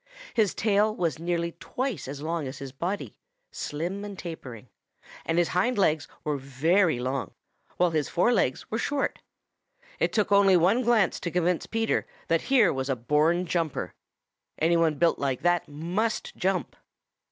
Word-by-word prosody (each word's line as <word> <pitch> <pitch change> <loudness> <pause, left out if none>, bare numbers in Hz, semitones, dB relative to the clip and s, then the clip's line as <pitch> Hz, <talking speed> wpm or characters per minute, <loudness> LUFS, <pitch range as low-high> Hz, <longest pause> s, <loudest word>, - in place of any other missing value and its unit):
His 215 -5 +2
tail 215 0 +2
was 165 - -1
nearly 170 0 -1
twice 250 - -3
as 140 +2 -6
long 160 -2 -2
as 130 +1 -7
his 135 -1 -7
body, 175 +9 -4 0.4
slim 175 +7 -4
and 205 -2 -7
tapering, 130 - -8 0.6
and 165 - +1
his 175 -1 +3
hind 225 +7 +1
legs 155 -6 +2 0.2
were 150 -1 -1
very 155 +5 +2
long, 130 +2 -3 0.4
while 180 -1 +3
his 155 -3 0
fore 235 +8 +3
legs 130 - +1
were 220 - -1
short. 285 +3 -1 0.8
It - - +1
took 210 -2 +1
only 200 -2 +6
one 190 +9 +3
glance 230 -5 +2
to 170 - -3
convince 175 0 0
Peter 225 0 0 0.2
that - - +3
here 245 -8 +5
was 135 0 -3
a 135 - +1
born 150 +8 +2
jumper. 165 -5 -2 0.6
Any 165 +2 +3
one 165 -2 +3
built 165 +3 +2
like 135 -3 -1
that 175 -1 +2
must 175 +10 -2
jump. 185 -3 -1
170 Hz, 165 wpm, -27 LUFS, 150-200 Hz, 0.8 s, only